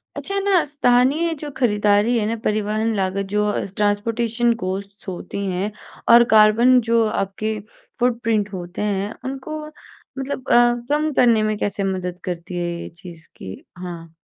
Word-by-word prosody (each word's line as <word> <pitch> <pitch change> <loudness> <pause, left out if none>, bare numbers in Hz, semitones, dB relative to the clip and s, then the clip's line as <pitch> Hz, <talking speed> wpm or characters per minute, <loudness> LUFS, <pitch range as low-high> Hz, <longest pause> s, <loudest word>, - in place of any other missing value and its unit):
अच्छा 395 0 -3
ना, 390 -3 +3
स्थानीय 285 +3 +2
जो 295 0 -7
खरीदारी 210 -1 +2
है 215 - 0
ना, 230 - -1
परिवहन 215 +1 0
लागत, 195 0 -1
जो 210 +2 0
अ, - - -2
ट्रांसपोर्टेशन 230 +3 +1
कॉस्ट्स 195 +2 -5
होती 190 +2 -5
हैं 190 +4 -2 0.4
और 235 0 +9
कार्बन 230 +4 +6
जो 230 0 +4
आपके 215 +1 -2 0.4
फ़ुटप्रिंट 230 -4 0
होते 175 0 -6
हैं, 205 0 -1
उनको 275 +4 -5 0.5
मतलब 270 -1 -5
अ, - - +4 0.4
कम 300 +1 +1
करने 235 -4 +4
में 215 0 0
कैसे 200 -1 -2
मदद 185 -2 -3
करती 175 0 -5
है 175 0 -1
ये - - -7
चीज़? 170 -3 -11
कि 95 0 -9
हाँ। 170 -2 -8
215 Hz, 150 wpm, -21 LUFS, 195-245 Hz, 0.5 s, और